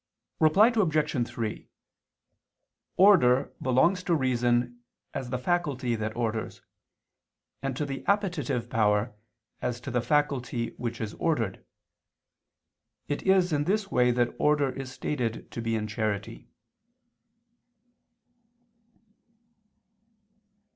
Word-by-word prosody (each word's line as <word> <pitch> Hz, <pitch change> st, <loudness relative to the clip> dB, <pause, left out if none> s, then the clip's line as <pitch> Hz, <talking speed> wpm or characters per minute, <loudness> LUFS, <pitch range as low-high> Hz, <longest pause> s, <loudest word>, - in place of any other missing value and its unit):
Reply 190 Hz, +9 st, +6 dB
Obj. 155 Hz, -, +1 dB
3: 110 Hz, -2 st, -5 dB, 1.3 s
Order 165 Hz, -10 st, +5 dB
belongs 165 Hz, +9 st, +3 dB
to 175 Hz, -, +2 dB
reason 120 Hz, -3 st, +1 dB, 0.3 s
as 125 Hz, -, -4 dB
the 125 Hz, -, -1 dB
faculty 135 Hz, -4 st, -1 dB
that 110 Hz, -1 st, -3 dB
orders, 115 Hz, -2 st, -3 dB, 1.0 s
and 135 Hz, -2 st, -3 dB
to 150 Hz, -, -1 dB
the 135 Hz, -1 st, -5 dB
appetitive 175 Hz, -, 0 dB
power 105 Hz, 0 st, +1 dB, 0.5 s
as 125 Hz, -1 st, -2 dB
to 130 Hz, -, -6 dB
the 125 Hz, 0 st, +1 dB
faculty 125 Hz, -3 st, 0 dB
which 120 Hz, -1 st, -4 dB
is 110 Hz, -2 st, -4 dB
ordered. 120 Hz, -, -1 dB, 1.4 s
It 145 Hz, -, -2 dB
is 185 Hz, -3 st, +4 dB
in 145 Hz, 0 st, +1 dB
this 200 Hz, +2 st, 0 dB
way 125 Hz, 0 st, +3 dB
that 120 Hz, 0 st, +1 dB
order 150 Hz, -2 st, +2 dB
is 135 Hz, -1 st, -7 dB
stated 120 Hz, -7 st, -3 dB
to 115 Hz, -, -5 dB
be 115 Hz, 0 st, -1 dB
in 110 Hz, -1 st, -2 dB
charity. 105 Hz, -1 st, -3 dB
125 Hz, 105 wpm, -27 LUFS, 115-150 Hz, 1.4 s, Reply